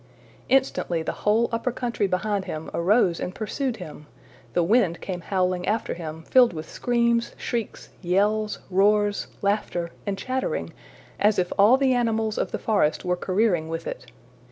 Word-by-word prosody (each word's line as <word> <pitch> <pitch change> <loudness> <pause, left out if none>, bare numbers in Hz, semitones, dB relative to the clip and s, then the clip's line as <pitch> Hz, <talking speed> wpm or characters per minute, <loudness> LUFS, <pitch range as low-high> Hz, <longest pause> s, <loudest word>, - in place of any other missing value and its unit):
Instantly 250 -10 +1
the - - -2
whole 220 +3 +1
upper 230 +2 -1
country 235 -4 -1
behind 195 +1 -1
him 155 0 -6
arose 180 0 +2
and 180 - -4
pursued 240 +3 -2
him! 150 -4 -10 0.5
The 175 - +2
wind 190 -3 +2
came 180 -2 -5
howling 185 -1 -1
after 215 +3 0
him, 160 -1 -7
filled 245 +2 +5
with 155 -1 -6
screams, 235 -1 0
shrieks, 235 -4 -4
yells, 205 +4 +1
roars, 205 +2 +2 0.2
laughter, 190 -4 -1 0.2
and 200 -1 -1
chattering, 225 - -3 0.5
as 210 +1 +3
if 180 -1 0
all 210 +6 +6
the 265 -1 +3
animals 225 -3 0
of - - -1
the - - -2
forest 195 -7 +1
were 180 0 +1
careering 185 -3 0
with 165 0 -4
it. 125 - -6
200 Hz, 155 wpm, -25 LUFS, 175-230 Hz, 0.5 s, all